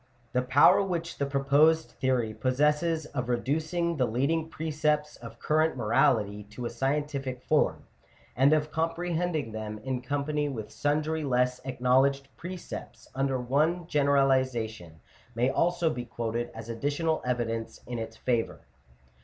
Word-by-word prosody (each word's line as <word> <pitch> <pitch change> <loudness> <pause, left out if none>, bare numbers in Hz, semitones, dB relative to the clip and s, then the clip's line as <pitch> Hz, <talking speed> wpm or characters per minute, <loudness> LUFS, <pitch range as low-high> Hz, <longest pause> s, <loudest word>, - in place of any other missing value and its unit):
The 125 - +2
power 130 +8 +6
which 170 -3 -3
the 140 - 0
proposed 145 +4 +3
theory 125 -4 0
possesses 150 +6 +1
of 125 -5 -4
reducing 160 +7 0
the 130 -3 +2
leading 150 +8 0
preceptl 150 -1 -1
of 115 -1 -10
current 155 +2 +1
morality 110 -4 +2
to 110 +4 -8
a - - -3
scientific 135 0 -2
form, - - +1 0.5
and 135 +3 +5
of 155 0 +2
comprehending 165 -3 -1
them, 110 0 -5
in 130 -2 -2
company 145 +3 -1
with 110 -6 -6
sundry 155 +2 0
less 125 -2 +1
acknowledged 135 +2 +2
precepts, 180 +1 -8
under 135 -1 0
one 155 +8 +1
generalization, 130 - +1 0.3
may 125 +3 +2
also 175 +2 +1
be 120 -2 -4
quoted 120 0 -3
as 115 0 -8
additional 145 +7 -1
evidence 115 -2 -2
in 120 -1 -4
its 110 0 -6
favour. 120 -3 -1
135 Hz, 135 wpm, -28 LUFS, 120-155 Hz, 0.5 s, power